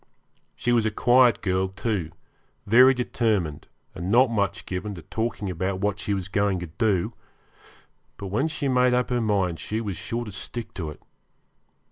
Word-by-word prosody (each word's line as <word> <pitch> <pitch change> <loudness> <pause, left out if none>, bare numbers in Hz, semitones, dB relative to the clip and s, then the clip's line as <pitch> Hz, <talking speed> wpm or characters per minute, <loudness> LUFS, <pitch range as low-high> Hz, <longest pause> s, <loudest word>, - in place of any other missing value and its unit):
She 120 - -1
was 115 -2 +3
a - - +2
quiet 120 +2 +4
girl, 95 -1 +1
too, 95 -3 -2 0.6
very 125 +5 +7
determined, 110 - -1 0.3
and 85 +3 -5
not 120 +3 +5
much 100 -3 -1
given 95 +3 -4
to 85 - -10
talking 110 -2 -3
about 95 +1 -2
what 100 0 -1
she 105 -1 -1
was 95 -1 -4
going 100 0 +1
to - - -3
do; 95 +2 0 1.0
but 100 - -6
when 115 +11 +1
she 150 -2 -3
made 125 -1 +3
up 125 0 0
her 120 -1 +1
mind 95 -6 0
she 110 - -3
was 100 -6 -4
sure 120 +1 -3
to 105 - -7
stick 110 +4 -7
to 80 -5 -4
it. 75 - -11
105 Hz, 175 wpm, -25 LUFS, 95-120 Hz, 1.0 s, very